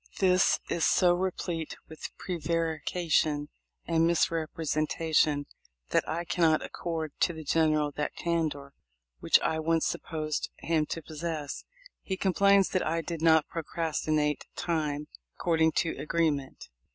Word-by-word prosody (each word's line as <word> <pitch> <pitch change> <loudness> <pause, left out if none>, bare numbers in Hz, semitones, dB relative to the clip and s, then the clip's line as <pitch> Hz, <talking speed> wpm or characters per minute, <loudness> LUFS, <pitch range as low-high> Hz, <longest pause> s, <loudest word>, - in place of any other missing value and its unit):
This 185 -1 +4
is 170 - -1
so 180 -2 +4
replete 175 -3 -2
with 160 -1 -7
pre 180 -2 -4
varication 160 -1 0 0.4
and 165 0 +2
misrepresentation, 155 -2 +1 0.4
that - - +1
I 170 +2 -2
cannot 165 -3 +2
accord 160 -3 -4
to 170 - +2
the 160 -1 -8
General 155 -1 +2
that 150 +1 -3
candor 155 -5 -2 0.5
which - - +5
I 160 - 0
once 165 0 +1
supposed 155 -2 -3
him 160 -2 0
to 165 - -5
possess. 155 -2 -5 0.4
He 190 - -3
complains 200 +1 +4
that 185 - 0
I 165 +2 0
did 165 0 -5
not 160 -2 +5
procrastinate 155 -2 -1
time 150 -4 -1 0.3
according 160 -2 +2
to 165 - +1
agreement. 150 -2 -1
160 Hz, 125 wpm, -29 LUFS, 155-170 Hz, 0.5 s, which